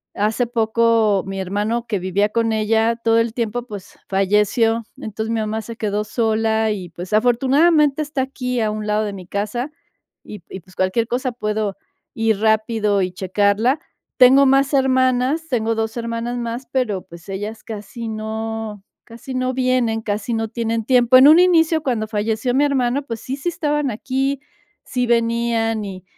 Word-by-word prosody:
Hace 215 +4 0
poco 225 -3 +2
mi 195 0 -4
hermano 210 +5 -2
que 210 -4 -1
vivía 190 +3 0
con 230 +1 0
ella 220 +1 +2
todo 230 -1 +2
el 230 -1 0
tiempo, 235 0 -2
pues 205 -3 -10
falleció. 210 +4 +2
Entonces, 220 +1 -5
mi 225 - 0
mamá 215 +1 -2
se 230 +1 -8
quedó 210 -1 -1
sola 220 0 +1
y, 185 -4 -5
pues, 175 +4 -8
afortunadamente 275 +6 +3
está 290 -3 -2
aquí 250 -2 -3
a 215 -1 0
un 215 0 -5
lado 210 +1 +1
de 205 - -4
mi 185 -3 -10
casa 215 +8 -3 0.5
y 210 - -9
p 175 - -13
y - - -5
pues, 185 +2 -21
cualquier 185 +5 0
cosa 255 +2 -1
puedo 210 -3 -2 0.4
ir 225 -2 +1
rápido 220 -2 +2
y 180 - -2
checarla. 200 - +1 0.4
Tengo 265 +2 +7
más 275 +1 +3
hermanas, 260 +3 +2
tengo 225 -3 0
2 225 0 -2
hermanas 235 +1 -3
más, 240 +2 -4
pero, 220 -8 -1
pues, 170 0 -14
ellas 210 +3 -5
casi 220 +1 -7
no 220 -1 -5 0.2
casi 235 +3 -9
no 255 0 -1
vienen, 255 -3 +1
casi 210 +2 -3
no 225 -1 -2
tienen 230 0 -2
tiempo. 250 0 +4
En 260 +2 +8
un 315 +3 +8
inicio, 330 -3 +4
cuando 235 -6 -1
falleció 220 +3 -1
mi 285 +2 +4
hermano, 270 -1 0
pues, 230 -5 -6
sí, 265 +2 -5
sí 285 - -6
estaban 295 -4 -1
aquí, 270 +5 -2 0.4
sí 250 -1 -2
venían 230 -2 +1
y 185 -2 -8
225 Hz, 170 wpm, -20 LUFS, 210-250 Hz, 0.5 s, En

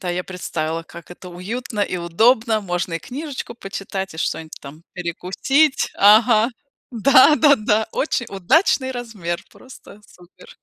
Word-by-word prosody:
Да, 180 - -3
я 180 +1 -3
представила, 165 -3 -4
как 170 0 -14
это 180 +1 -11
уютно 210 +5 -6
и 190 -2 -1
удобно. 220 +6 +2
Можно 180 -2 -3
и 165 - -2
книжечку 265 - -7
почитать, 195 -2 -6
и - - -10
что-нибудь 160 -1 -3
там 150 +4 -12
перекусить. 190 - 0
Ага, 215 +2 +5 0.4
да-да-да. 260 -3 +4
Очень 250 -5 -1
удачный 260 - +1
размер! 215 -9 -5
Просто 255 -5 -15
супер. 175 0 -18
205 Hz, 130 wpm, -20 LUFS, 175-245 Hz, 0.4 s, Ага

